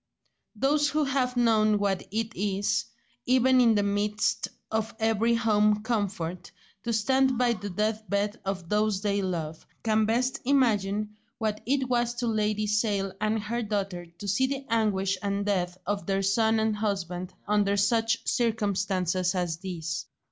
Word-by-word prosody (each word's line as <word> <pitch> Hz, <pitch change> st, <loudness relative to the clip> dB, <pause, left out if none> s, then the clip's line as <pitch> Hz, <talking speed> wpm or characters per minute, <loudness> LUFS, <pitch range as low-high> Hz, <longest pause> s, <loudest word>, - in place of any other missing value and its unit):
Those 290 Hz, +6 st, +2 dB
who 305 Hz, +2 st, +1 dB
have 260 Hz, -3 st, 0 dB
known 215 Hz, -3 st, +4 dB
what 200 Hz, -2 st, 0 dB
it 225 Hz, +2 st, -3 dB
is, 205 Hz, +2 st, 0 dB, 0.4 s
even 255 Hz, +1 st, +5 dB
in 230 Hz, -2 st, +5 dB
the 205 Hz, -, +2 dB
midst 205 Hz, +1 st, 0 dB, 0.2 s
of 220 Hz, 0 st, -2 dB
every 225 Hz, +1 st, +2 dB
home 210 Hz, -2 st, +2 dB
comfort, 195 Hz, -6 st, -2 dB, 0.4 s
to 235 Hz, -, 0 dB
stand 260 Hz, +3 st, +2 dB
by 245 Hz, -1 st, +3 dB
the 205 Hz, -1 st, -6 dB
death 215 Hz, +3 st, -2 dB
bed 205 Hz, +2 st, -1 dB
of 190 Hz, -3 st, -4 dB
those 210 Hz, 0 st, +1 dB
they 200 Hz, -1 st, +1 dB
love, 165 Hz, -4 st, -3 dB, 0.2 s
can 220 Hz, -1 st, +2 dB
best 250 Hz, +3 st, 0 dB
imagine 210 Hz, -6 st, +1 dB, 0.2 s
what 215 Hz, -1 st, -2 dB
it 270 Hz, 0 st, +1 dB
was 240 Hz, -1 st, 0 dB
to 240 Hz, -, -2 dB
Lady 215 Hz, -1 st, 0 dB
Sale 205 Hz, -2 st, 0 dB
and 215 Hz, 0 st, 0 dB
her 235 Hz, +3 st, -2 dB
daughter 195 Hz, -5 st, -3 dB
to 170 Hz, +4 st, -10 dB
see 210 Hz, +7 st, +2 dB
the 275 Hz, 0 st, -4 dB
anguish 195 Hz, -4 st, +1 dB
and 200 Hz, 0 st, -1 dB
death 180 Hz, -3 st, -1 dB
of 205 Hz, +2 st, -2 dB
their 195 Hz, 0 st, 0 dB
son 220 Hz, +3 st, +2 dB
and 220 Hz, -1 st, 0 dB
husband 185 Hz, -3 st, -3 dB
under 205 Hz, -1 st, +2 dB
such 225 Hz, +2 st, +1 dB
circumstances 195 Hz, -5 st, 0 dB
as 175 Hz, -3 st, -1 dB
these. 165 Hz, -5 st, -5 dB
210 Hz, 155 wpm, -27 LUFS, 195-230 Hz, 0.4 s, even